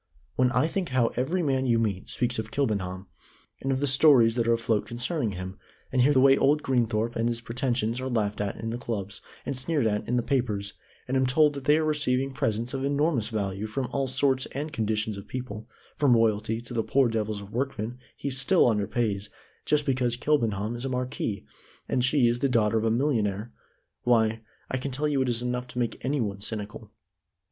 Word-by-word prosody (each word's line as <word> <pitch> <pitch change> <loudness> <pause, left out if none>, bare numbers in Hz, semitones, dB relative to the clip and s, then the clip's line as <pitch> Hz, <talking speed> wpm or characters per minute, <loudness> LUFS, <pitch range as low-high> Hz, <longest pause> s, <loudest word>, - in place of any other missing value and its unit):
When 125 0 +3
I 125 +4 +3
think 180 +2 -2
how 125 -3 +2
every 165 +9 -1
man 135 -3 +1
you 120 -1 +3
meet 105 -5 -1
speaks 120 -2 -1
of 110 0 -4
Kilbenham, 100 -8 -2 0.6
and 135 - -1
of 130 - 0
the 145 - +1
stories 135 -4 +6
that 115 -1 0
are 115 - +4
afloat 115 -2 0
concerning 120 - -2
him, 95 +1 -7 0.3
and 130 - +2
hear 135 +4 +5
the 135 - +4
way 135 +1 +7
old 150 +2 +3
Greenthorpe 120 -3 0
and 115 +1 +1
his 120 -1 -2
pretensions 120 -1 -1
are 130 - -3
laughed 105 -4 -1
at 100 -1 -2
in 115 0 -4
the 120 - -4
clubs, 105 -4 -4 0.2
and 140 - -2
sneered 135 +1 -1
at 105 -1 0
in 125 - 0
the 120 - +1
papers, 110 -7 -1 0.3
and 130 - -1
am 130 -1 +3
told 150 +3 +4
that 140 -2 -7
they 150 +1 +5
are 160 - +1
receiving 135 -3 +1
presents 115 -1 -1
of 135 -1 -2
enormous 140 -4 +1
value 100 -1 -2
from 125 +3 -3
all 135 -1 0
sorts 130 0 +1
and 150 +2 -4
conditions 110 -3 -1
of 100 - -9
people, 120 -3 -6 0.3
from 140 -5 +4
Royalty 110 0 +1
to 120 - -9
the 115 - +1
poor 135 +3 +3
devils 110 -2 -2
of 100 0 -11
workmen 125 -1 -3 0.2
he 140 - -3
still 135 +8 +3
under 105 -4 +2
pays 105 -4 -1 0.4
just 150 -1 +2
because 125 -3 +1
Kilbenham 115 -7 0
is 120 - -5
a 135 - -2
marquis 125 -5 -3 0.4
and 125 - +1
she 125 -1 +4
is 120 +1 +1
the 140 - +1
daughter 115 -2 +2
of 110 - -2
a - - +3
millionaire, 115 -4 0 0.5
why, 115 -2 +2 0.3
I 130 - -2
can 130 +2 -4
tell 140 +3 -1
you 140 -3 +1
it 130 - +1
is 120 0 -1
enough 125 0 -2
to 125 - -10
make 120 -2 -2
any 140 +3 0
one 100 -4 -2
cynical." 105 0 -4
120 Hz, 215 wpm, -27 LUFS, 110-135 Hz, 0.6 s, way